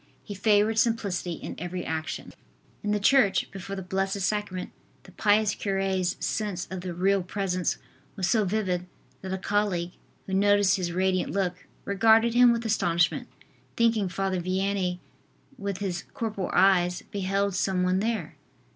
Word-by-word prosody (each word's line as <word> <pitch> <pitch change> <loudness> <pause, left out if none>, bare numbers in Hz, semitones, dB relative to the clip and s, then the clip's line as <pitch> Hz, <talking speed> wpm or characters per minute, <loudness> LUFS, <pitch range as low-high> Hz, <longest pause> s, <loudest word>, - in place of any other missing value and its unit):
He 205 - -7
favored 210 +2 +3
simplicity 200 -7 0
in - - -7
every 180 +1 -4
action. 160 -1 -4 0.5
In 210 - -2
the 210 0 +1
church, 200 -3 +3
before 195 +1 -6
the 190 - -5
Blessed 195 +2 -1
Sacrament, 190 -2 -2 0.3
the - - -15
pious 210 0 +2
cure's 195 -2 -1
sense 205 -5 -2
of 190 -1 -4
the 180 0 -5
Real 195 +2 +2
Presence 185 -1 -1 0.4
was 190 -4 -1
so 220 0 +3
vivid 185 -3 -1 0.3
that 190 - -6
a 190 - -1
colleague, 190 -3 0 0.3
who 190 - -6
noticed 205 0 +4
his 175 -2 -2
radiant 185 +1 0
look, 180 -2 -2 0.2
regarded 225 +3 +4
him 245 0 +7
with 235 0 -1
astonishment, 175 -6 +1 0.5
thinking 225 -4 +2
Father 185 0 -1
Vianney 185 0 -1 0.6
with 200 -2 -3
his 185 -3 -3
corporal 215 -5 -3
eyes, 180 -2 +3
beheld 200 0 0
some 185 0 0
one 185 +1 +2
there. 215 -6 -2
195 Hz, 150 wpm, -27 LUFS, 180-205 Hz, 0.6 s, him